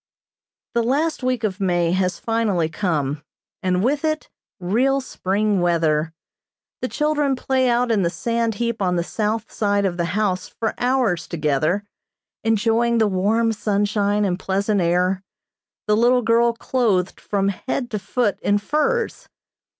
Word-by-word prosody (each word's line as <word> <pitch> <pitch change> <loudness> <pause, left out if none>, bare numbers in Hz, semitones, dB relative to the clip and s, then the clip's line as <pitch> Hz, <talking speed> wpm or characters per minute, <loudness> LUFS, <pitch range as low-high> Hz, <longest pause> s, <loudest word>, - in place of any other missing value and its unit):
The 235 - +2
last 290 +7 0
week 255 -2 -1
of 200 -2 -1
May 175 -3 +1
has 185 -1 0
finally 220 -8 0
come, 155 -5 -1 0.4
and 185 0 +1
with 280 +5 +1
it 310 -1 -2 0.3
real 245 +10 +2
spring 205 -4 -1
weather. 165 -2 +1 0.7
The 255 - -1
children 295 -1 0
play 260 0 +1
out 240 0 +2
in 215 -3 +2
the 170 - +2
sand 230 +3 -1
heap 235 0 -2
on 180 -2 +1
the 170 - 0
south 215 +4 -2
side 205 -1 +1
of 180 -2 -1
the 170 - 0
house 190 -4 0
for 225 -1 -3
hours 245 -10 +1
together, 155 +4 0 0.6
enjoying 225 +2 +2
the 220 - +4
warm 215 +4 +1
sunshine 205 0 +1
and 180 -1 -1
pleasant 200 +2 0
air, 180 +2 +1 0.6
the 210 - +3
little 245 +2 +3
girl 235 +1 +3
clothed 225 -6 0
from 200 -1 0
head 245 +5 -3
to 210 - -2
foot 210 +1 -1
in 205 - +2
furs. 430 - -1
210 Hz, 150 wpm, -22 LUFS, 185-235 Hz, 0.7 s, the